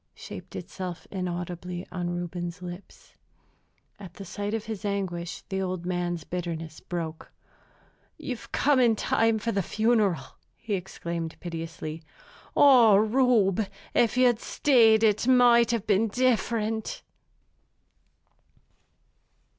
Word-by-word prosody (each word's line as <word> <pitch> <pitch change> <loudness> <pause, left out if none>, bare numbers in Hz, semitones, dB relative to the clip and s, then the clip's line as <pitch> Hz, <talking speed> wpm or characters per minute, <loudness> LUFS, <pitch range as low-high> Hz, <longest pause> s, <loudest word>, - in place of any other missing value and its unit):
shaped - - -10
itself 180 -3 -6
inaudibly 180 -1 -4
on 175 -1 -3
Reuben's 175 0 -5
lips. 175 +2 -10 0.9
At 190 -3 -11
the 195 - -9
sight 205 +4 -3
of 220 -1 -4
his 220 -2 -6
anguish 185 -4 -3
the 190 -1 -2
old 185 -2 -3
man's 175 -2 -2
bitterness 165 -3 -5
broke. 165 -2 -6 0.9
"You've 250 -4 -7
come 285 -2 +3
in 235 -3 +4
time 225 +1 +2
for 230 +2 -2
the 195 - 0
funeral," 215 - +1 0.3
he 220 - -5
exclaimed 170 -3 -4
piteously. 165 -2 -6 0.6
"Oh, 245 -7 +7
Reube, 220 -3 +3 0.2
if 235 +1 +2
you'd 245 -3 +4
stayed 230 -7 +4
it 220 +2 +2
might 240 -2 +6
have 230 -3 -1
been 215 +1 +2
different!" 225 -2 0
195 Hz, 115 wpm, -27 LUFS, 175-225 Hz, 0.9 s, Oh